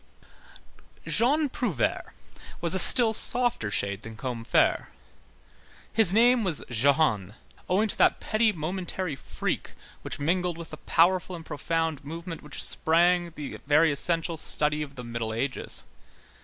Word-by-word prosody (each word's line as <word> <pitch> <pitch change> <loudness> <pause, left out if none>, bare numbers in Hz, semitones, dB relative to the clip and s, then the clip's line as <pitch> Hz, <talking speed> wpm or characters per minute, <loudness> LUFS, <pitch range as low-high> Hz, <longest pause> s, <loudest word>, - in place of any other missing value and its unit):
Jean 290 +6 +1
Prouvaire 220 - -3 0.5
was 170 0 -2
a 190 - +4
still 230 +4 +9
softer 240 - +2
shade 100 0 -2
than 110 -1 -10
Combeferre. 120 -1 0 1.1
His 220 -5 +3
name 235 +3 +4
was 175 -7 -3
Jehan, 120 - +1 0.3
owing 205 +4 +2
to - - -3
that - - +3
petty 220 0 +1
momentary 180 -1 -4
freak 130 - -5 0.3
which - - -6
mingled 175 +3 -1
with 170 -1 -10
the - - -8
powerful 180 +2 +1
and 165 -2 -11
profound 160 0 -3
movement 165 +3 -8
whence 150 - -4
sprang 175 +2 +2
the 145 -2 -7
very 155 +2 +4
essential 165 +3 -2
study 150 0 0
of 140 -2 -7
the 125 - -8
Middle 115 -2 -5
Ages. 130 +3 -4
165 Hz, 135 wpm, -26 LUFS, 140-185 Hz, 1.1 s, still